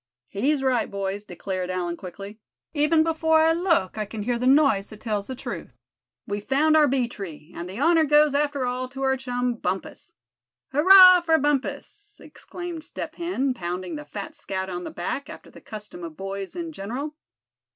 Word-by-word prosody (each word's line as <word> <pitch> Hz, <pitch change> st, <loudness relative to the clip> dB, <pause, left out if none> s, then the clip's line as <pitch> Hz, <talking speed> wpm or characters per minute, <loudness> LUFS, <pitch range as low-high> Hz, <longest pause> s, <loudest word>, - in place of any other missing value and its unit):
"He's 270 Hz, +7 st, 0 dB
right, 255 Hz, -4 st, +1 dB
boys," 200 Hz, +1 st, -4 dB
declared 185 Hz, 0 st, -4 dB
Allan, 180 Hz, -2 st, -2 dB
quickly; 195 Hz, +4 st, -9 dB, 0.3 s
"even 310 Hz, +1 st, +3 dB
before 320 Hz, 0 st, +2 dB
I 325 Hz, +1 st, +4 dB
look 330 Hz, -, +1 dB
I 215 Hz, -, -1 dB
can 210 Hz, 0 st, -6 dB
hear 240 Hz, +1 st, -1 dB
the 250 Hz, -, 0 dB
noise 270 Hz, -8 st, +4 dB
that 215 Hz, -, -12 dB
tells 210 Hz, -3 st, -2 dB
the 260 Hz, -, -5 dB
truth. -, -, -7 dB, 0.5 s
We've 205 Hz, 0 st, -4 dB
found 300 Hz, +6 st, +3 dB
our 305 Hz, -1 st, +6 dB
bee 260 Hz, -2 st, +1 dB
tree; 175 Hz, -7 st, -9 dB
and 175 Hz, +1 st, -6 dB
the 190 Hz, -, -7 dB
honor 330 Hz, -1 st, +4 dB
goes 295 Hz, 0 st, +4 dB
after 285 Hz, -2 st, 0 dB
all 250 Hz, +1 st, -3 dB
to 270 Hz, +1 st, -6 dB
our 265 Hz, 0 st, +3 dB
chum, 250 Hz, -1 st, -2 dB
Bumpus." 190 Hz, -2 st, -4 dB, 0.6 s
"Hurrah 365 Hz, +5 st, +9 dB
for 325 Hz, -1 st, +3 dB
Bumpus!" 300 Hz, +8 st, -2 dB
exclaimed 350 Hz, -3 st, -8 dB
Step -, -, -6 dB
Hen, 335 Hz, -7 st, -1 dB
pounding 180 Hz, -4 st, -4 dB
the 150 Hz, -, -6 dB
fat 195 Hz, +7 st, -7 dB
scout 190 Hz, -1 st, -4 dB
on 180 Hz, 0 st, -5 dB
the -, -, -4 dB
back, 225 Hz, +11 st, -4 dB
after -, -, -11 dB
the -, -, -14 dB
custom 210 Hz, -5 st, -9 dB
of 165 Hz, -2 st, -8 dB
boys 195 Hz, -, -5 dB
in 335 Hz, -2 st, -4 dB
general. 275 Hz, +5 st, -5 dB
250 Hz, 180 wpm, -25 LUFS, 195-305 Hz, 0.6 s, Hurrah